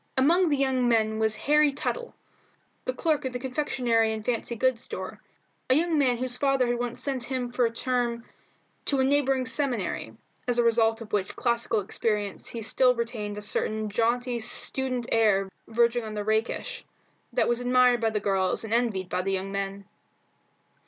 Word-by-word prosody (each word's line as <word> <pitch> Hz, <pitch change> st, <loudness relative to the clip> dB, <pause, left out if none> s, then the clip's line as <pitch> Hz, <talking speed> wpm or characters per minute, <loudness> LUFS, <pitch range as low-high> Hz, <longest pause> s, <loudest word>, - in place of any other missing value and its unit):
Among 335 Hz, +7 st, +4 dB
the 290 Hz, -, +2 dB
young 260 Hz, -2 st, +1 dB
men 220 Hz, -1 st, +2 dB
was 220 Hz, -1 st, +2 dB
Harry 295 Hz, +6 st, +3 dB
Tuttle, 480 Hz, -, -4 dB, 0.7 s
the -, -, 0 dB
clerk 315 Hz, -8 st, 0 dB
in 260 Hz, -1 st, -3 dB
the -, -, -1 dB
confectionery 250 Hz, -4 st, 0 dB
and 215 Hz, -1 st, -6 dB
fancy 235 Hz, 0 st, -1 dB
goods 255 Hz, 0 st, +1 dB
store, -, -, -7 dB, 0.5 s
a 255 Hz, -, +5 dB
young 325 Hz, 0 st, +2 dB
man 250 Hz, -4 st, +3 dB
whose 250 Hz, 0 st, -2 dB
father 275 Hz, -2 st, +2 dB
had 240 Hz, 0 st, -1 dB
once 245 Hz, -1 st, -3 dB
sent 265 Hz, -4 st, -2 dB
him 255 Hz, -2 st, -3 dB
for 245 Hz, 0 st, +2 dB
a -, -, -5 dB
term 240 Hz, -1 st, -1 dB, 0.6 s
to 275 Hz, -, +2 dB
a -, -, +4 dB
neighbouring 270 Hz, -1 st, +2 dB
seminary, 245 Hz, -, -1 dB, 0.3 s
as 245 Hz, -1 st, +1 dB
a 240 Hz, -, +4 dB
result 225 Hz, -1 st, +3 dB
of 220 Hz, -, -10 dB
which 195 Hz, -3 st, -1 dB
classical 235 Hz, -2 st, 0 dB
experience 205 Hz, 0 st, -2 dB
he 230 Hz, -2 st, -5 dB
still 250 Hz, +3 st, +3 dB
retained 225 Hz, -3 st, -4 dB
a -, -, -4 dB
certain 215 Hz, +1 st, -1 dB
jaunty 240 Hz, +3 st, 0 dB
student 250 Hz, +2 st, -2 dB
air 195 Hz, -4 st, +3 dB, 0.2 s
verging 235 Hz, +1 st, +2 dB
on 215 Hz, -1 st, -6 dB
the 210 Hz, -, -2 dB
rakish, 225 Hz, -, -1 dB, 0.5 s
that -, -, +1 dB
was 240 Hz, 0 st, +1 dB
admired 250 Hz, -1 st, +4 dB
by 225 Hz, -, +2 dB
the 215 Hz, -1 st, -1 dB
girls 195 Hz, -1 st, 0 dB
and 220 Hz, 0 st, -4 dB
envied 225 Hz, -6 st, 0 dB
by 180 Hz, 0 st, -1 dB
the 195 Hz, +1 st, -1 dB
young 190 Hz, +1 st, -2 dB
men. 195 Hz, 0 st, -4 dB
240 Hz, 180 wpm, -27 LUFS, 220-260 Hz, 0.7 s, a